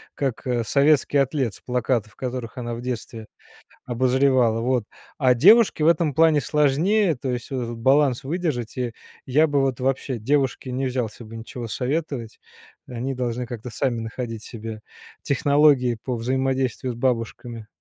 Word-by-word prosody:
как, 135 -3 -3
э, 120 -2 0
советский 140 +3 +3
атлет 135 -4 +1
с - - -14
плакатов, 125 -2 -1
которых 125 -2 -5
она 120 -1 -4
в 115 - -6
детстве 115 -3 -5 0.6
обозревала. 125 -1 +2
Вот. 125 0 +1 0.3
А 130 -3 +4
девушке 195 - +5
в - - +5
этом 165 -3 +3
плане 160 0 +4
сложнее, 160 +7 +2
то 130 +1 -4
есть 120 0 -5
вот 130 -2 -2
этот 120 0 -5
баланс 135 +1 +2
выдержать. 145 -8 -3
И 125 -2 -2 0.3
я 150 +5 +3
бы 145 -2 +1
вот 135 -2 0
вообще 130 0 -1
девушке 135 +1 0
не 130 +1 -1
взялся 125 -3 -3
бы 115 +1 -10
ничего 115 +1 -7
советовать. 125 - -3 0.5
Они 125 +2 -4
должны 125 -1 -2
как-то 120 0 -7
сами 120 0 -1
находить 115 -1 -5
себе 110 -1 -8 0.4
технологии 140 -3 +3
по 125 - -2
взаимодействию 130 +1 -1
с - - -10
бабушками. 115 -2 -2
125 Hz, 155 wpm, -23 LUFS, 120-140 Hz, 0.6 s, девушке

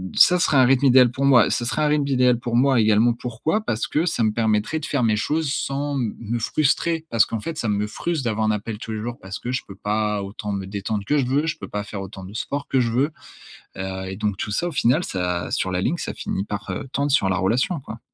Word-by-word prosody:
ça 180 0 +6
serait 155 - +3
un 130 - +7
rythme 135 +2 +3
idéal 125 -1 +6
pour 135 +3 -1
moi. 125 -5 +6
Ça 120 - 0
serait 155 +5 0
un - - +3
rythme 150 -1 +1
idéal 125 -3 +3
pour 120 -1 -3
moi 130 0 +4
également 110 +2 +4
pourquoi? 125 - -2
Parce 115 - -2
que 155 +3 0
ça 120 -8 0
me 110 - +3
permettrait 110 +6 0
de 155 - -6
faire 140 -4 0
mes 110 -2 +3
choses 150 +5 0
sans 140 0 -2
m 115 -4 -2
me 115 +1 -3
frustrer. 155 +6 0
Parce 115 -2 +4
qu'en 115 - -4
fait 160 +7 -5
ça 115 - -1
me 105 0 0
frustre 160 +5 -3
d'avoir 110 -1 0
un - - +3
appel 105 +1 -3
tous 115 - -7
les 110 - -4
jours 120 +2 -5
parce 95 +1 -6
que 125 - -4
je 130 - -1
peux 95 - -10
pas 105 0 -1
autant 105 +1 -6
me 100 -1 -3
détendre 100 +1 -3
que 150 - +2
je 135 - +2
veux, 140 +4 +1
je 155 - -2
peux - - -7
pas 105 0 -3
faire 100 -1 -6
autant 95 0 -8
de 95 - -10
sport 140 +5 -4
que 135 - +1
je 120 -2 +1
veux. 135 +6 +1 0.7
Heu 95 0 -4
et 95 - -6
donc 105 -2 -1
tout 105 - -4
ça, 170 +11 0
au - - -7
final, 130 +7 +2
ça 90 - -2
sur 95 - 0
la 90 - -1
ligne, 170 - 0
ça - - -4
finit 95 - -3
par, 105 -1 -5
heu, 110 - -5
tendre 140 0 0
sur 100 -9 +3
la 95 - +1
relation, 125 - +1
quoi. 115 -3 -9
115 Hz, 270 wpm, -23 LUFS, 105-140 Hz, 0.7 s, un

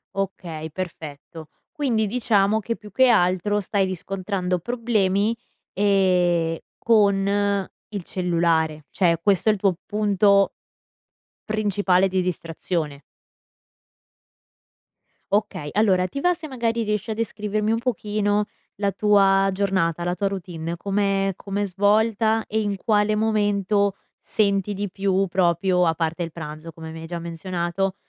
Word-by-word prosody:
Okay, 175 -5 -4
perfetto. 160 -2 -7 0.2
Quindi 240 -7 0
diciamo 215 -2 +2
che, 230 +2 -3
più 210 -2 -13
che 260 +6 +4
altro, 205 -1 +2
stai 200 0 0
riscontrando 185 0 -2
problemi, 220 -1 0 0.4
ehm, 180 -4 +2 0.2
con 200 -2 +2 0.2
il 200 -3 -4
cellulare, 165 -4 0
cioè 170 0 +2
questo 200 +3 +2
è - - +7
il - - -3
tuo 190 -3 +1
punto 200 -1 +3 0.9
principale 205 -3 +2
di 185 0 0
distrazione. 165 -4 -3 2.3
Okay, 205 -8 0
allora, 190 -3 +3
ti 280 - -5
va 355 +5 +3
se 330 -3 -9
magari 235 -3 -1
riesci 210 +1 -2
a - - 0
descrivermi 215 -1 -2
un 225 - +2
pochino 210 -3 0 0.3
la 200 - +2
tua 195 -1 +4
giornata, 185 -4 0
la 175 0 0
tua 200 +2 -1
routine, 170 -4 -5
come 195 +1 0
com'è 200 +1 -3
svolta 220 +3 +2
e 220 - -1
in 205 -2 -1
quale 210 +1 +1
momento 205 -2 +1 0.2
senti 200 -1 0
di 205 0 -3
più 195 0 +1
proprio, 180 0 +2
a 165 - +2
parte 165 +1 -2
il 165 -1 -6
pranzo, 155 0 -8
come 160 0 -9
mi 160 - -8
hai 165 - -8
già 170 +1 -5
menzionato, 175 +2 -3
195 Hz, 130 wpm, -23 LUFS, 175-210 Hz, 2.3 s, è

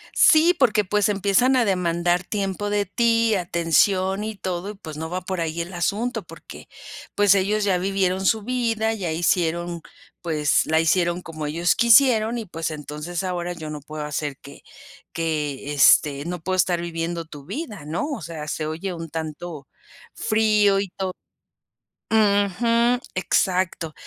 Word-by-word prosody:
Sí, 330 +3 +6
porque, 215 -6 +3
pues, 210 +2 +1
empiezan 205 +6 +2
a 245 - +3
demandar 175 -2 +1
tiempo 200 +1 -3
de 205 0 0
ti, 230 +2 +2
atención 185 +3 +1
y 220 -1 -5
todo. 185 +1 -4
Y - - -8
pues, 155 -6 -9
no 160 - -4
va 180 +2 -4
por 185 -1 -4
ahí 165 +1 -2
el 175 - -9
asunto, 205 +8 -2
porque, - - -13 0.5
pues, 205 -1 +5
ellos 205 +2 +1
ya 190 -3 +2
vivieron 190 0 0
su 220 +1 +2
vida, 225 -2 0
ya 185 -7 -3
hicieron 170 +1 0 0.4
pues, 150 -4 +1
la 160 0 +2
hicieron 175 +1 +1
como 155 -3 -6
ellos 170 +4 +1
quisieron. 235 -1 +4
Y 225 - -4
pues, 165 -2 -4
entonces, 150 +4 -5
ahora 175 -1 -3
yo 155 -2 -7
no 150 -1 -6
puedo 150 +1 -7
hacer 145 -1 -3
que 140 - -14 0.5
que 150 -4 -2
este 140 +1 +4
no 175 -1 -4
puedo 185 +2 -1
estar 175 -2 +2
viviendo 170 0 -4
tu 145 -3 -11
vida, 210 - -6
¿no? 170 - -2
O 260 -9 -5
sea, 155 -2 -7
se 155 +1 -3
oye 165 +5 -4
un 165 -1 -7
tanto 160 -2 -6 0.5
frío 210 -2 +2
y 200 - -3
todo 190 -1 -4 1.0
ujú, 220 +3 +2 0.2
exacto. 180 -3 0
180 Hz, 160 wpm, -23 LUFS, 165-210 Hz, 1.0 s, Sí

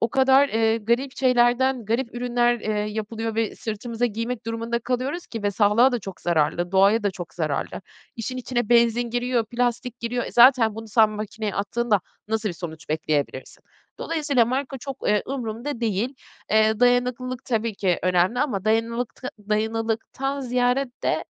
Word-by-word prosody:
o 230 - +2
kadar, 265 +3 +4
eee, 225 -1 +2
garip 240 +5 -1
şeylerden, 250 0 +3
garip 230 +3 -2
ürünler, 240 -1 +1
eee, - - -6
yapılıyor 215 +2 -3
ve 225 -1 -1
sırtımıza 230 +2 -2
giymek 230 +1 -4
durumunda 230 +1 -2
kalıyoruz 255 +8 -3
ki 225 -3 -6
ve 205 - +1
sağlığa 210 +6 +4
da 245 - 0
çok 190 -4 -9
zararlı, 175 +1 0
doğaya 200 +4 +4
da 205 - +1
çok 180 -2 -9
zararlı. 155 -5 -2 0.4
İşin 235 +3 -4
içine 240 -3 -2
benzin 235 0 +3
giriyor, 245 0 0
plastik 245 +1 -2
giriyor. 240 +1 -2
E, - - -7
zaten 240 -3 +6
bunu 225 0 -8
sen 215 0 +4
makineye 215 0 -4
attığında 210 +1 0 0.3
nasıl 220 0 0
bir 175 - -5
sonuç 160 -2 -8
bekleyebilirsin? 150 -3 -2 0.3
Dolayısıyla 295 -7 +1
marka 265 +3 -3
çok, 270 +1 -6
eee, 210 0 +3
umurumda 240 0 -4
değil. 225 +4 -1 0.4
Eee, 220 +1 +3
dayanıklılık 245 0 +1
tabii 225 -3 -1
ki 185 -3 0
önemli 185 +5 +2
ama 245 -10 -1
dayanılılıkta 230 +3 -1 0.2
dayanıklılıktan 225 +5 -1
ziyade 250 +1 +1
de, - - 0
230 Hz, 155 wpm, -24 LUFS, 210-245 Hz, 0.4 s, zaten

